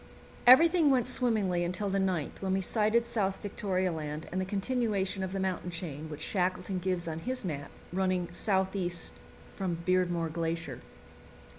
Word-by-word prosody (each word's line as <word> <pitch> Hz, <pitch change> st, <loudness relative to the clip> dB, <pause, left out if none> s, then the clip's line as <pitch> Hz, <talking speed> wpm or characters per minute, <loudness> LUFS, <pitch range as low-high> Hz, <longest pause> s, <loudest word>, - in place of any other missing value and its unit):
Everything 325 Hz, +4 st, +8 dB
went 255 Hz, -4 st, +3 dB
swimmingly 215 Hz, -8 st, +1 dB
until 180 Hz, +4 st, -1 dB
the 195 Hz, 0 st, +1 dB
9th, 185 Hz, -6 st, -1 dB
when 190 Hz, -1 st, 0 dB
we 190 Hz, -, +1 dB
sighted 220 Hz, +4 st, +2 dB
South 200 Hz, -5 st, -1 dB
Victoria 190 Hz, -2 st, -1 dB
Land 155 Hz, -1 st, -5 dB
and 185 Hz, +2 st, -1 dB
the -, -, -1 dB
continuation 200 Hz, -1 st, 0 dB
of 190 Hz, -1 st, -2 dB
the 195 Hz, -, -2 dB
mountain 185 Hz, -2 st, -2 dB
chain, 160 Hz, -3 st, -5 dB
which 150 Hz, -1 st, -7 dB
Shackleton 185 Hz, 0 st, 0 dB
gives 180 Hz, -1 st, -1 dB
on 160 Hz, 0 st, -3 dB
his 255 Hz, +5 st, -3 dB
map, 145 Hz, -5 st, -4 dB, 0.2 s
running 185 Hz, -1 st, +1 dB
southeast 190 Hz, -2 st, 0 dB, 0.4 s
from 185 Hz, -4 st, -2 dB
Beardmore 175 Hz, -3 st, +1 dB
Glacier. 165 Hz, -5 st, -2 dB
185 Hz, 155 wpm, -30 LUFS, 175-205 Hz, 0.4 s, Everything